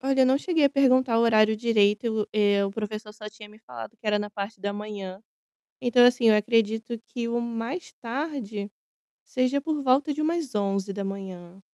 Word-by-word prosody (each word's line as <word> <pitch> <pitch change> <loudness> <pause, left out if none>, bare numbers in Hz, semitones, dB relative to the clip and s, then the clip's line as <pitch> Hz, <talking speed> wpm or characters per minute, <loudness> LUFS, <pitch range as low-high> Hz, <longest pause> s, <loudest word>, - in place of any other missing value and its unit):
Olha, 270 0 +1
eu 260 - +6
não 260 +1 +3
cheguei 325 -1 +1
a 280 - +5
perguntar 260 -3 +3
o - - +3
horário 220 -1 +4
direito 210 -2 +2
e - - +2
o 220 -1 -2
eh, 205 -1 +3
o 195 - -2
professor 210 0 -6
só 215 0 -9
tinha 210 0 -13
me 210 +1 -17
falado 125 - -10
que 215 - -14
era 210 0 +2
na 210 0 -4
parte 200 0 -6
da 205 +1 -2
manhã. 200 -2 -7 0.6
Então, 245 -1 +5
assim, 245 -2 +5
acredito 225 +1 +1
que 235 -3 -4
o 235 0 -1
mais 235 +8 -5
tarde 230 -5 -4 0.5
seja 255 +2 0
por 300 0 -2
volta 275 +3 +2
de 305 - -3
umas 315 -5 -1
11h. 195 -2 -4
220 Hz, 190 wpm, -26 LUFS, 205-255 Hz, 0.6 s, eu